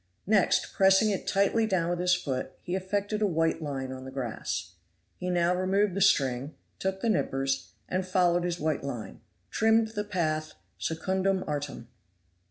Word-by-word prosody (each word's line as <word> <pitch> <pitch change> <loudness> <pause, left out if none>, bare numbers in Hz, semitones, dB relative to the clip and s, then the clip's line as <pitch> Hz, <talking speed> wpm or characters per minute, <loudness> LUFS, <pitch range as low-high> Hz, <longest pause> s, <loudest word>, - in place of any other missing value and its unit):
Next 205 -1 +2
pressing 195 +2 +5
it 195 - -3
tightly 205 +3 +2
down 175 -4 +1
with 175 - -1
his 180 0 +3
foot, 135 -7 -3
he 175 - -4
effected 205 +3 -2
a 210 - +4
white 165 -2 +1
line 135 -3 -4
on 130 0 -7
the 130 - -7
grass. 130 -4 -4 0.5
He 180 - -3
now 175 0 +2
removed 190 +2 +1
the 200 - -2
string, 135 -6 +2 0.2
took 190 0 -2
the 230 - +1
knippers, 135 -9 0 0.2
and 185 +1 -1
following 180 -1 +2
his 175 0 -2
white 155 -2 -1
line, 120 -8 -6 0.3
trimmed 225 0 +3
the 210 -2 -3
path 155 -6 -1 0.3
secundum 190 +3 0
artem. 145 -5 -4
180 Hz, 165 wpm, -28 LUFS, 145-195 Hz, 0.5 s, pressing